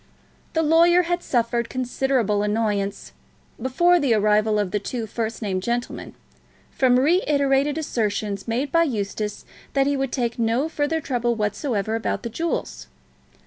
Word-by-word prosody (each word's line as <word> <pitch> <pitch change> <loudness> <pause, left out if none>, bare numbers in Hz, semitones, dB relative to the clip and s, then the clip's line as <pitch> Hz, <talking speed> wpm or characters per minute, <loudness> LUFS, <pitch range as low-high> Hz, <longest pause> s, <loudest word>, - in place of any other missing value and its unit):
The 320 - +1
lawyer 340 +3 +5
had 350 +1 -1
suffered 235 -3 0
considerable 250 -4 0
annoyance, 210 -2 -1 0.5
before 345 +8 +3
the 270 -7 +2
arrival 210 0 +2
of 205 -3 -1
the 210 - 0
two 230 +3 -4
first 225 +1 -4
named 190 -3 -1
gentlemen, 240 +4 -3 0.6
from 250 -2 +3
reiterated 285 -2 +2
assertions 210 -8 -2
made 255 +5 -1
by 335 - +4
Eustace 210 -7 -2 0.3
that 275 -1 +3
he 285 0 +1
would 270 -2 -2
take 240 -2 -2
no 230 +6 +1
further 320 0 -1
trouble 240 -4 -1
whatsoever 210 0 -1
about 225 0 -2
the 235 - -3
jewels. 330 +8 -3
240 Hz, 145 wpm, -23 LUFS, 215-285 Hz, 0.6 s, lawyer